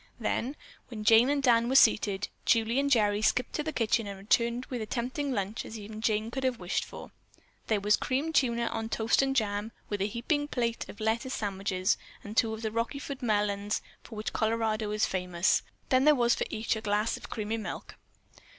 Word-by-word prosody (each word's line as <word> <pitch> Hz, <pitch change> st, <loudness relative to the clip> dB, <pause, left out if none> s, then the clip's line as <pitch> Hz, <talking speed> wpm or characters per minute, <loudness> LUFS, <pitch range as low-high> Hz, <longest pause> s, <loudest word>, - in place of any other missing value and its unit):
Then, 265 Hz, +5 st, -1 dB, 0.3 s
when 220 Hz, -3 st, -7 dB
Jane 225 Hz, +4 st, +6 dB
and 285 Hz, -1 st, +1 dB
Dan 235 Hz, -2 st, +4 dB
were 265 Hz, -, 0 dB
seated, 205 Hz, -5 st, +4 dB, 0.2 s
Julie 230 Hz, +2 st, +2 dB
and 280 Hz, 0 st, +1 dB
Gerry 210 Hz, -5 st, +3 dB
skipped 250 Hz, +3 st, +1 dB
to -, -, -1 dB
the 315 Hz, +1 st, -3 dB
kitchen 230 Hz, -4 st, +1 dB
and 200 Hz, -1 st, -6 dB
returned 235 Hz, +5 st, +1 dB
with 245 Hz, -3 st, -5 dB
as 215 Hz, -, -4 dB
tempting 260 Hz, +5 st, -2 dB
a -, -, -1 dB
lunch 200 Hz, +1 st, -2 dB
as 220 Hz, -, -8 dB
even 215 Hz, +1 st, -8 dB
Jane 220 Hz, 0 st, 0 dB
could 265 Hz, +2 st, -4 dB
have 255 Hz, -2 st, +1 dB
wished 180 Hz, -1 st, -1 dB
for. -, -, -10 dB, 0.6 s
There 215 Hz, -2 st, +2 dB
was 210 Hz, +1 st, +3 dB
creamed 285 Hz, +5 st, -1 dB
tuna 235 Hz, -5 st, +2 dB
on 225 Hz, -1 st, -3 dB
toast 225 Hz, +2 st, +2 dB
and 270 Hz, 0 st, 0 dB
jam 210 Hz, -2 st, 0 dB, 0.2 s
and 205 Hz, -1 st, -1 dB
a 200 Hz, -, +2 dB
heaping 290 Hz, +7 st, -1 dB
plate 235 Hz, -4 st, -2 dB
of -, -, -10 dB
lettuce 225 Hz, +4 st, -1 dB
sandwiches 195 Hz, -2 st, 0 dB, 0.3 s
and 205 Hz, +1 st, -8 dB
two 225 Hz, -1 st, +3 dB
of 220 Hz, +1 st, -6 dB
the 220 Hz, -, -1 dB
Rockyford 265 Hz, +5 st, -3 dB
melons 205 Hz, -2 st, 0 dB, 0.2 s
for 225 Hz, -, -11 dB
which 215 Hz, +1 st, -4 dB
Colorado 220 Hz, -1 st, 0 dB
is 210 Hz, 0 st, +1 dB
famous. 180 Hz, -1 st, +1 dB, 0.3 s
Then 260 Hz, +1 st, +4 dB
there 300 Hz, 0 st, +7 dB
was 240 Hz, -2 st, +3 dB
for -, -, -1 dB
each 220 Hz, +1 st, -1 dB
a 220 Hz, -, -5 dB
glass 210 Hz, +1 st, 0 dB
of -, -, -10 dB
creamy 220 Hz, +1 st, -3 dB
milk. 220 Hz, -, -6 dB
225 Hz, 205 wpm, -29 LUFS, 210-245 Hz, 0.6 s, there